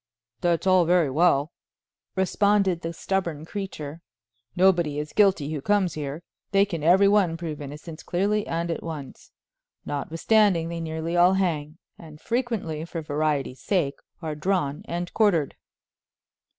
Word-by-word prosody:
"That's 175 Hz, 0 st, +1 dB
all 185 Hz, -2 st, +5 dB
very 170 Hz, -4 st, +3 dB
well," 155 Hz, 0 st, +3 dB, 0.6 s
responded 190 Hz, -1 st, +2 dB
the 165 Hz, -, -3 dB
stubborn 170 Hz, -3 st, -2 dB
creature; 165 Hz, -5 st, -6 dB, 0.5 s
"nobody 175 Hz, -5 st, +3 dB
is 150 Hz, 0 st, -4 dB
guilty 185 Hz, -8 st, +3 dB
who 150 Hz, -, -3 dB
comes 200 Hz, 0 st, +1 dB
here; 150 Hz, +2 st, -5 dB, 0.3 s
they 200 Hz, 0 st, +4 dB
can 170 Hz, -6 st, -5 dB
every 185 Hz, +6 st, +5 dB
one 195 Hz, -5 st, +3 dB
prove 160 Hz, -3 st, -5 dB
innocence 150 Hz, +3 st, -8 dB
clearly 205 Hz, +4 st, 0 dB
and 170 Hz, +1 st, -2 dB
at 165 Hz, -, -3 dB
once. 155 Hz, -5 st, -8 dB, 0.6 s
Notwithstanding, 165 Hz, +4 st, +1 dB
they 170 Hz, 0 st, -4 dB
nearly 160 Hz, +1 st, -3 dB
all 175 Hz, +2 st, +5 dB
hang, 160 Hz, -5 st, -1 dB, 0.2 s
and 155 Hz, -2 st, -12 dB
frequently, 225 Hz, -11 st, -2 dB
for 165 Hz, -1 st, -6 dB
variety's 145 Hz, -3 st, -1 dB
sake, 155 Hz, -9 st, 0 dB, 0.2 s
are 155 Hz, -1 st, -2 dB
drawn 150 Hz, -2 st, -1 dB
and 175 Hz, +1 st, -4 dB
quartered." 175 Hz, -10 st, +2 dB
170 Hz, 140 wpm, -25 LUFS, 155-190 Hz, 0.6 s, all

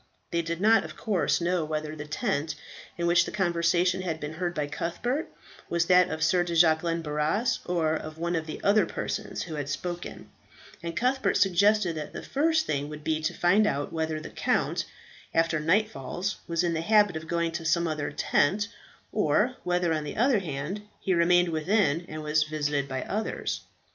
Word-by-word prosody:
They 170 Hz, -, +1 dB
did 170 Hz, 0 st, -4 dB
not, 220 Hz, +3 st, +5 dB
of -, -, -9 dB
course, 205 Hz, -6 st, +1 dB
know 175 Hz, 0 st, +1 dB
whether 155 Hz, 0 st, -3 dB
the 150 Hz, -1 st, -7 dB
tent 155 Hz, -3 st, -1 dB, 0.4 s
in 170 Hz, -, -1 dB
which 175 Hz, 0 st, +5 dB
the -, -, -5 dB
conversation 175 Hz, -1 st, +1 dB
had 165 Hz, -4 st, -3 dB
been 150 Hz, +1 st, -5 dB
heard 175 Hz, +1 st, -3 dB
by 150 Hz, -, 0 dB
Cuthbert 240 Hz, -, -3 dB, 0.4 s
was 170 Hz, 0 st, +1 dB
that 180 Hz, 0 st, +5 dB
of 160 Hz, 0 st, -2 dB
Sir 175 Hz, +3 st, +3 dB
de 170 Hz, -1 st, -3 dB
Jacquelin 165 Hz, 0 st, +3 dB
Barras, 155 Hz, +10 st, 0 dB
or 165 Hz, -3 st, +1 dB
of 155 Hz, 0 st, -5 dB
one 170 Hz, +1 st, -1 dB
of 160 Hz, -1 st, -2 dB
the 155 Hz, -, -6 dB
other 200 Hz, -3 st, +4 dB
persons -, -, -4 dB
who 165 Hz, -, -7 dB
had 145 Hz, -2 st, -4 dB
spoken; 175 Hz, +5 st, -5 dB, 0.5 s
and 170 Hz, 0 st, -5 dB
Cuthbert 260 Hz, +3 st, +1 dB
suggested 200 Hz, 0 st, +3 dB
that 150 Hz, -1 st, -6 dB
the -, -, -6 dB
first 315 Hz, +3 st, +1 dB
thing 145 Hz, 0 st, -2 dB
would 150 Hz, 0 st, -8 dB
be 155 Hz, 0 st, 0 dB
to 155 Hz, -, -2 dB
find 205 Hz, +5 st, +4 dB
out 145 Hz, +1 st, -2 dB
whether 160 Hz, -1 st, -1 dB
the 155 Hz, -, -9 dB
count, -, -, 0 dB, 0.5 s
after 165 Hz, -1 st, +2 dB
nightfall, 180 Hz, -1 st, 0 dB, 0.2 s
was 170 Hz, 0 st, 0 dB
in 170 Hz, -1 st, +1 dB
the 160 Hz, -, -1 dB
habit 205 Hz, 0 st, +4 dB
of 160 Hz, 0 st, -6 dB
going 170 Hz, -1 st, 0 dB
to 165 Hz, 0 st, -4 dB
some 165 Hz, +1 st, +2 dB
other 150 Hz, -2 st, -2 dB
tent, 195 Hz, +8 st, +1 dB, 0.4 s
or 250 Hz, 0 st, +2 dB
whether, 175 Hz, -2 st, +1 dB
on 155 Hz, -1 st, -1 dB
the 145 Hz, -, -6 dB
other 240 Hz, 0 st, +4 dB
hand, 160 Hz, +3 st, -4 dB, 0.2 s
he 190 Hz, -, 0 dB
remained 175 Hz, +1 st, +4 dB
within, 170 Hz, 0 st, +1 dB
and 155 Hz, 0 st, -6 dB
was 150 Hz, +1 st, +2 dB
visited 150 Hz, -2 st, -1 dB
by 130 Hz, -1 st, -3 dB
others. 215 Hz, +2 st, -3 dB
170 Hz, 190 wpm, -27 LUFS, 155-185 Hz, 0.5 s, not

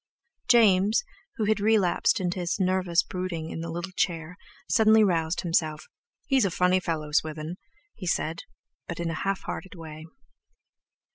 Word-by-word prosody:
James, 210 Hz, -, +5 dB, 0.3 s
who 220 Hz, -, -1 dB
had 215 Hz, 0 st, +2 dB
relapsed 210 Hz, 0 st, +2 dB
into 180 Hz, 0 st, -2 dB
his 175 Hz, +3 st, -2 dB
nervous 185 Hz, -2 st, +2 dB
brooding 180 Hz, -3 st, -4 dB
in -, -, -5 dB
the 165 Hz, -, -5 dB
little 175 Hz, +3 st, -5 dB
chair, 170 Hz, -2 st, -2 dB, 0.3 s
suddenly 220 Hz, 0 st, +5 dB
roused 170 Hz, -3 st, +1 dB
himself: 160 Hz, -2 st, 0 dB, 0.4 s
"He's 270 Hz, -4 st, +3 dB
a 195 Hz, -, +2 dB
funny 180 Hz, +1 st, +2 dB
fellow, 160 Hz, -4 st, -3 dB
Swithin," 155 Hz, +2 st, -1 dB, 0.4 s
he 185 Hz, -, -8 dB
said, 165 Hz, -1 st, -1 dB, 0.5 s
but 170 Hz, -, -6 dB
in 170 Hz, -1 st, -2 dB
a 160 Hz, -, -4 dB
half 195 Hz, 0 st, -1 dB
hearted 190 Hz, 0 st, -7 dB
way. 160 Hz, -1 st, -9 dB
180 Hz, 150 wpm, -26 LUFS, 165-195 Hz, 0.5 s, James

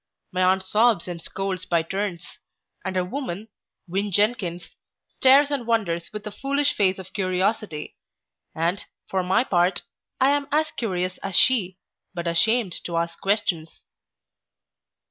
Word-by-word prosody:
My 185 Hz, -1 st, -1 dB
aunt 185 Hz, +1 st, +3 dB
sobs 215 Hz, -1 st, +2 dB
and 175 Hz, -2 st, -6 dB
scolds 190 Hz, 0 st, -4 dB
by 170 Hz, -2 st, +1 dB
turns; 190 Hz, 0 st, -4 dB, 0.4 s
and 190 Hz, -1 st, -3 dB
her 180 Hz, -1 st, +1 dB
woman, 220 Hz, -2 st, -5 dB, 0.4 s
Win. 195 Hz, +3 st, -1 dB
Jenkins, 190 Hz, -4 st, 0 dB, 0.5 s
stares 275 Hz, +2 st, +6 dB
and 260 Hz, -5 st, -2 dB
wonders 175 Hz, -8 st, 0 dB
with 210 Hz, 0 st, -7 dB
a 210 Hz, -, -4 dB
foolish 280 Hz, +6 st, 0 dB
face 190 Hz, -2 st, +2 dB
of 190 Hz, 0 st, -10 dB
curiosity; 185 Hz, -3 st, -1 dB, 0.6 s
and, 170 Hz, +4 st, 0 dB, 0.2 s
for 190 Hz, -, 0 dB
my 190 Hz, +6 st, +2 dB
part, 180 Hz, -4 st, +1 dB, 0.4 s
I 265 Hz, +1 st, +5 dB
am 285 Hz, -1 st, 0 dB
as 310 Hz, +1 st, +2 dB
curious 185 Hz, -5 st, -2 dB
as 195 Hz, -1 st, -4 dB
she, 190 Hz, -8 st, +3 dB, 0.4 s
but 170 Hz, -1 st, -4 dB
ashamed 185 Hz, +4 st, +2 dB
to 170 Hz, -1 st, -2 dB
ask 170 Hz, 0 st, -2 dB
questions. 185 Hz, -5 st, -1 dB
190 Hz, 145 wpm, -24 LUFS, 175-225 Hz, 0.6 s, stares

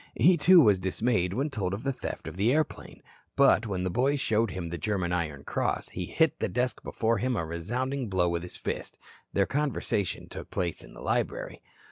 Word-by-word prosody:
He, 180 Hz, +1 st, +6 dB
too, 170 Hz, +2 st, +7 dB
was 105 Hz, -8 st, +5 dB
dismayed 95 Hz, 0 st, 0 dB
when 140 Hz, +9 st, -1 dB
told 100 Hz, -6 st, -2 dB
of 100 Hz, -, -8 dB
the 135 Hz, 0 st, 0 dB
theft 125 Hz, -, -6 dB
of 80 Hz, -, -6 dB
the 105 Hz, +6 st, +2 dB
airplane. 155 Hz, +2 st, -2 dB, 0.3 s
But 110 Hz, -, +5 dB
when 95 Hz, -3 st, -2 dB
the 95 Hz, -, -1 dB
boys 135 Hz, +7 st, +1 dB
showed 110 Hz, -3 st, +2 dB
him 90 Hz, -2 st, -5 dB
the 85 Hz, +1 st, -4 dB
German 90 Hz, -1 st, -1 dB
Iron 75 Hz, -5 st, -2 dB
Cross -, -, -1 dB
he 90 Hz, -1 st, -5 dB
hit 160 Hz, -3 st, +2 dB
the -, -, 0 dB
desk 125 Hz, 0 st, -1 dB
before 115 Hz, -1 st, 0 dB
him 125 Hz, +3 st, 0 dB
a 85 Hz, -, -1 dB
resounding 120 Hz, +10 st, -2 dB
blow 90 Hz, -2 st, +2 dB
with 85 Hz, 0 st, -1 dB
his 90 Hz, -, -7 dB
fist. -, -, -4 dB, 0.4 s
Their 100 Hz, -, +3 dB
conversation 135 Hz, -, -1 dB
took -, -, -8 dB
place 85 Hz, -3 st, -2 dB
in -, -, -14 dB
the -, -, -11 dB
library. -, -, -2 dB
105 Hz, 205 wpm, -28 LUFS, 90-130 Hz, 0.4 s, too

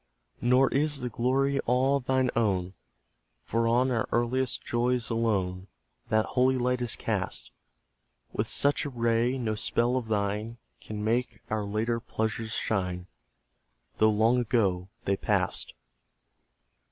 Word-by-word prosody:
Nor 125 Hz, +2 st, +4 dB
is 145 Hz, +1 st, +1 dB
the 125 Hz, -, -2 dB
glory 135 Hz, +4 st, +1 dB
all 130 Hz, +3 st, +3 dB
thine 130 Hz, -1 st, +1 dB
own, 95 Hz, -5 st, +1 dB, 0.7 s
For 115 Hz, +1 st, 0 dB
on 125 Hz, +3 st, +3 dB
our 115 Hz, -3 st, 0 dB
earliest 125 Hz, +2 st, 0 dB
joys 120 Hz, -1 st, 0 dB
alone 95 Hz, -5 st, 0 dB, 0.4 s
That 110 Hz, 0 st, +3 dB
holy 130 Hz, +1 st, +2 dB
light 125 Hz, 0 st, 0 dB
is 120 Hz, -3 st, 0 dB
cast. -, -, -2 dB, 0.8 s
With -, -, -1 dB
such 145 Hz, +1 st, +2 dB
a 145 Hz, -, -3 dB
ray, 120 Hz, 0 st, +1 dB
no 115 Hz, -4 st, -1 dB
spell 120 Hz, +3 st, 0 dB
of 120 Hz, -3 st, -3 dB
thine 105 Hz, +2 st, -1 dB, 0.2 s
Can 105 Hz, -1 st, -6 dB
make 115 Hz, +1 st, -1 dB
our 110 Hz, -1 st, 0 dB
later 110 Hz, +3 st, -1 dB
pleasures 110 Hz, -1 st, -3 dB
shine, 90 Hz, -4 st, -1 dB, 0.9 s
Though 110 Hz, -, +6 dB
long 110 Hz, +4 st, +3 dB
ago 100 Hz, -6 st, +1 dB, 0.2 s
they 100 Hz, 0 st, +1 dB
passed. -, -, -1 dB
115 Hz, 130 wpm, -28 LUFS, 110-125 Hz, 0.9 s, Though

